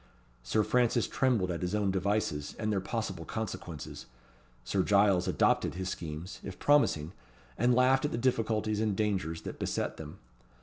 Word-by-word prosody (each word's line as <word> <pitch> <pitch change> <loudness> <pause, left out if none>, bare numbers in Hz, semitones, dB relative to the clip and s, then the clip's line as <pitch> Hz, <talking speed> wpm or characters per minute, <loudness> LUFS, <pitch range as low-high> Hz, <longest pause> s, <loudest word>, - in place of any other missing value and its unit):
Sir - - +1
Francis 120 0 +2
trembled 115 -9 +1
at 85 - -4
his 90 +3 -1
own 100 -2 +1
devices 95 -6 -1
and 110 -1 -1
their 100 - +1
possible 95 -4 -3
consequences: 85 -6 -6 0.6
Sir 95 +11 0
Giles 100 -2 +3
adopted - - +2
his 95 0 -3
schemes, 80 +1 -6
if 95 - -7
promising, 115 - +3 0.4
and 120 +2 +3
laughed 130 +2 +4
at 150 - -1
the - - -2
difficulties 110 -3 0
and 105 -3 +1
dangers 95 -6 -1
that - - -7
beset - - -2
them. 75 -1 -9
100 Hz, 160 wpm, -30 LUFS, 90-110 Hz, 0.6 s, laughed